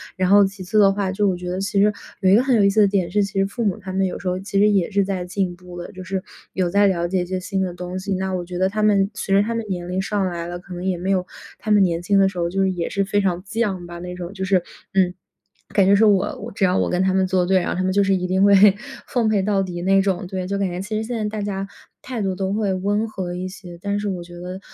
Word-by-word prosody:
然 185 -1 0
后 200 0 +7
其 195 0 -6
次 190 +4 +1
的 200 -1 +6
话， 195 -1 -1
就 205 +2 +1
我 190 - +1
觉 180 0 -6
得 180 +1 -2
其 200 0 0
实 210 0 +4 0.3
有 190 - +4
一 - - +7
个 225 - +5
很 265 -2 +2
有 215 - +4
意 200 - +5
思 205 +2 +1
的 200 - +6
点 190 -4 0
是， 205 +2 +2
其 195 - -5
实 195 - +3
父 220 +4 -4
母 200 0 0
他 190 -3 -8
们 195 0 +1
有 180 - -3
时 190 - -6
候 180 +1 -2
其 195 +1 -4
实 205 - +5
也 195 -4 +2
是 200 -1 +2
在 190 -2 -3
进 185 -1 -2
步 180 0 -12
的， 175 - -7
就 185 - -9
是 190 0 -3 0.3
有 185 -2 0
在 200 +2 +4
了 175 -2 0
解 185 +1 0
一 - - -6
些 185 +1 -3
新 190 +1 -2
的 185 -2 -2
东 180 +1 -5
西， 195 +1 -3
那 190 0 -2
我 180 -1 -2
觉 180 0 -6
得 190 +1 +2
他 215 +2 -2
们 200 -2 +3
随 195 -2 -1
着 200 - +5
他 230 - -2
们 230 - -2
年 175 -2 -3
龄 185 +1 -1
上 200 0 -1
来 170 -2 -3
了， 175 0 -5
可 185 +1 -11
能 175 0 -6
也 185 -2 0
没 185 +3 -2
有 185 -2 +1 0.3
他 220 - -6
们 205 -1 +6
年 170 -2 0
轻 200 +3 +2
的 195 - +5
时 185 - -11
候 170 0 0
就 195 +2 -1
是 190 - +2
也 175 -2 -3
是 200 - 0
非 205 +1 +1
常 180 -2 -1
犟 205 -4 -2
吧 175 0 -8
那 180 +1 -6
种 180 +1 -7
就 190 -2 -5
是， 185 -2 +2 0.3
嗯， 185 -2 +3 0.6
感 195 - +4
觉 195 +1 +5
说 215 +2 +5
我 195 -2 0
只 195 - -2
要 180 0 +2
我 - - +1
跟 180 - +1
他 190 0 +2
们 190 0 +2
作 185 -1 +1
对， 190 +1 +3
然 175 - -2
后 - - -1
他 185 - -1
们 185 - +1
就 200 - +3
是 195 0 +2
一 180 -1 -2
定 190 +2 +2
会 200 - +6 0.5
奉 240 -3 +1
陪 210 -2 +2
到 200 0 +1
底 175 -2 -5
那 195 +1 +4
种。 190 -2 -1
对， 185 0 -4
就 200 +1 -2
感 200 -1 0
觉 175 0 -5
其 210 +2 -4
实 220 - -2
现 235 +1 -4
在 215 - -2
大 205 - -2
家 195 -1 -3 0.3
态 250 -3 -5
度 190 -2 -1
都 190 +1 -2
会 210 -2 0
温 205 +4 0
和 185 -5 -5
一 180 +1 -4
些， 185 -2 -10
但 205 0 -1
是 205 - -3
我 180 -3 -4
觉 175 0 -12
得， 180 +1 -6
190 Hz, 340 characters per minute, -22 LUFS, 180-200 Hz, 0.6 s, 后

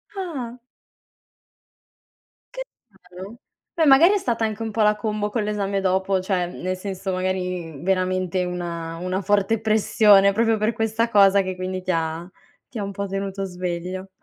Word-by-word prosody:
Ah. 270 -11 -5 1.9
Che - - -5 0.3
strano! 190 +2 -12 0.4
Beh, 325 - +2
magari 305 +7 +7
è - - +3
stata 235 - -2
anche 220 0 -2
un 220 - -4
pò 220 - -1
la 210 0 +4
combo 210 -2 -2
con 220 0 -2
l'esame 200 -1 -1
dopo 190 0 +1
cioè, 185 -1 -1
mhmm, 175 - -10
nel 185 +1 -2
senso, 190 0 -5
magari 180 -4 -3
veramente 185 0 0
una 170 -2 -5
una 185 +2 -2
forte 205 +2 +1
pressione, 210 -2 +4
proprio 225 +1 +2
per 215 +2 0
questa 225 +1 0
cosa 200 -2 +5
che 185 -1 -4
quindi 185 0 -4
ti 185 0 -2
ha 165 +1 -2 0.4
ti 245 - -9
ha - - -2
un 200 - -4
pò 200 +1 -4
tenuto 195 0 -4
sveglio. 180 +1 -5
195 Hz, 165 wpm, -23 LUFS, 185-215 Hz, 1.9 s, magari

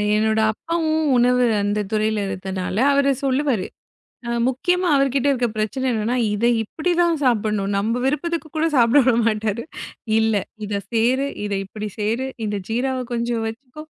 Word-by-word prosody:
என்னோட 220 +1 +2
அப்பாவும் 315 +2 -1
உணவு 250 +1 +3 0.2
அந்தத் 205 0 -1
துறையில 215 0 +1
இருந்தனால 190 0 -4 0.2
அவரு 280 0 +3
சொல்லுவாரு. 265 -6 +1 0.6
அ - - -4 0.2
முக்கியமா 355 +8 0
அவர்கிட்ட 275 0 +1
இருக்க 250 -2 0
பிரச்சனை 220 +5 -2
என்னன்னா, 225 +3 -1 0.2
இதை 235 +3 +2
இப்படித்தான் 340 +6 0
சாப்பிட்ணும். 215 -4 +1
நம்ம 225 +5 0
விருப்பத்துக்கு 330 +3 -2
கூடச் 315 -1 +1
சாப்பிட 240 +4 +5
விடமாட்டாரு. 225 -2 +1 0.6
இல்ல. 220 -1 +2 0.3
இதைச் 200 -1 -4
சேரு 255 +5 +2 0.2
இதை 200 -1 -1
இப்படிச் 210 0 -7
சேரு, 225 +5 -1 0.2
இந்த 205 -1 -2
ஜீராவை 255 +3 -1
கொஞ்சம் 235 -1 -1
வச்சுக்கோ, 255 +6 -10
235 Hz, 140 wpm, -21 LUFS, 215-275 Hz, 0.6 s, சாப்பிட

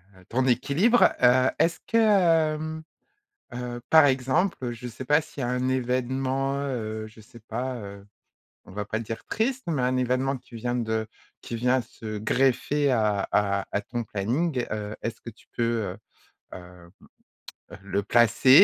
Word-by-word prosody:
heu, 95 0 -19
ton 130 +2 +1
équilibre. 140 - +4
Heu, 130 +1 +5
est-ce 165 0 +2
que, 230 - +2
hem, 160 -7 +2 0.7
heu, 120 0 -5
par 160 -2 +8
exemple, 130 +1 0
je 120 +1 -7
sais 120 +2 -8
pas 150 +3 +4
s'il 145 -3 -8
y - - 0
a - - -1
un 125 +1 0
événement, 130 +2 0
heu, 110 -6 -3
je 110 +1 -15
sais 110 +2 -15
pas, 125 +3 -4
heu, 100 -3 -9 0.6
on - - -13
va 105 +2 -4
pas 110 +2 -3
dire 115 0 -6
triste, 255 +4 -1
mais 155 -6 0
un 125 +1 +1
événement 130 +2 0
qui 125 -1 -15
vient 120 +2 -2
de 110 -2 -1 0.3
qui 120 - -6
vient 125 +2 +2
se 110 -2 -7
greffer 135 +5 +1
à 105 -5 +1
à 100 -1 +1
à 105 - 0
ton 120 +1 -4
planning. 125 - -1
Heu, 105 0 -4
est-ce 115 -1 -5
que 115 - -8
tu 110 - -24
peux, 120 - +1 0.3
heu - - -13 0.6
heu 90 -1 -12 0.8
heu, - - -10
le 100 +1 -1
placer? 120 +4 +3
125 Hz, 170 wpm, -26 LUFS, 110-135 Hz, 0.8 s, par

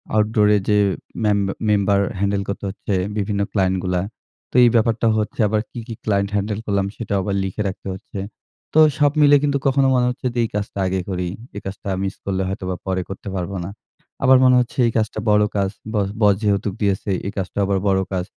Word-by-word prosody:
Outdoor 105 0 +3
এ - - +4
যে 105 - +4 0.5
মেম 105 -1 +3 0.3
member 100 -1 +3 0.2
handle 100 +1 0
করতে 100 0 -4
হচ্ছে 100 +1 -4 0.2
বিভিন্ন 100 0 -1
ক্লায়েন্টগুলা। 95 -2 0 0.5
তো - - -18
এই 120 - +7
ব্যাপারটা 115 0 +2
হচ্ছে 105 -1 -3
আবার 105 +1 +1
কি, - - -7
কি 115 - -5
ক্লায়েন্ট 100 -2 +1
হ্যান্ডেল 105 +1 -1
করলাম 100 -1 0
সেটাও 105 -4 -2
আবার 100 +1 -1
লিখে 95 +2 -3
রাখতে 95 0 -6
হচ্ছে। 95 +1 -8 0.5
তো 155 - +5 0.2
সব 145 -1 +4
মিলে 145 0 +7
কিন্তু 140 -1 +2
কখনো 135 0 +3
মনে 125 -1 +3
হচ্ছে 125 +1 -3
যে 120 - -1
এই 115 - -1
কাজটা 105 -1 -3
আগে 95 0 -1
করি। 90 -1 -2 0.3
এই 100 - -5
কাজটা 95 +1 -6
মিস 95 0 -3
করলে 95 -1 -1
হয়তোবা 95 -1 -3
পরে 95 -1 -1
করতে 95 - -8
পারব 90 0 -3
না। 85 - -5 0.5
আবার 130 -1 +7
মনে 130 0 +6
হচ্ছে 120 - -2
এই - - 0
কাজটা 110 -1 -1
বড় 105 0 +5
কাজ 100 -1 +1 0.2
বস 100 -2 +1
বস 105 -1 +6
যেহেতুক 100 -1 +1
দিয়েছে, 100 0 0 0.2
এই 100 - -2
কাজটা 95 +1 -4
আবার 100 0 +1
বড় 95 -1 +3
কাজ। 90 -1 -1
100 Hz, 200 wpm, -21 LUFS, 95-110 Hz, 0.5 s, এই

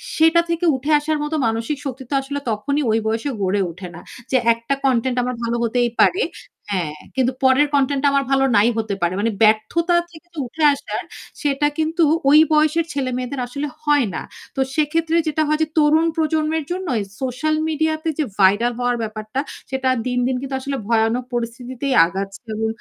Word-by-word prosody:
সেটা 325 +1 +5
থেকে 335 +1 0
উঠে 275 +4 -2
আসার 305 +1 -1
মতো 295 +1 -2
মানসিক 225 +6 -2
শক্তি 265 -1 -5
তো - - -4
আসলে 285 +1 -4
তখনই 280 +8 -1
ওই 220 - +3
বয়সে 225 +5 -1
গড়ে 195 +1 +1
ওঠে 180 +2 -9
না। - - -10 0.3
যে 260 - +4 0.2
একটা 230 +4 -3
কনটেন্ট 255 -1 +1
আমার 250 0 -2
ভালো 235 0 -1
হতেই 240 +1 +1
পারে 400 +6 +4 0.5
হ্যাঁ, 170 -6 -1 0.2
কিন্তু 260 -1 +2
পরের 265 +3 +5
কনটেন্টটা 280 0 +2
আমার 275 0 +3
ভালো 270 0 +3
নাই 210 +3 +5
হতে 220 -3 -1
পারে। 175 +1 +1
মানে 225 +2 +1
ব্যর্থতা 220 +12 +3 0.2
থেকে 345 +1 -16 0.2
উঠে 310 +6 -4
আসার 280 - -5 0.4
সেটা 290 0 +1
কিন্তু 320 +2 +1 0.3
ওই 300 +2 +8
বয়সের 310 +2 +3
ছেলে-মেয়েদের 255 -1 -3
আসলে 280 +4 -4
হয় 295 -4 +3
না। - - -3 0.3
তো - - -4 0.2
সেক্ষেত্রে 320 +2 +1
যেটা 310 0 0
হয় 305 +1 +1
যে - - -1
তরুণ 310 +1 +4
প্রজন্মের 315 0 0
জন্য 370 +1 -3 0.3
সোশ্যাল 265 +4 -1
মিডিয়াতে 315 +1 -1
যে - - +3 0.2
ভাইরাল 205 +5 +4
হওয়ার 245 0 +1
ব্যাপারটা 215 +3 -5 0.3
সেটা 265 -1 0 0.2
দিনদিন 250 +1 0
কিন্তু 270 0 -4
আসলে 275 +1 -3
ভয়ানক 225 +2 +2
পরিস্থিতিতেই 245 +3 -3
আগাচ্ছে 195 +5 -6
এবং 220 +1 -1
270 Hz, 175 wpm, -20 LUFS, 230-305 Hz, 0.5 s, ওই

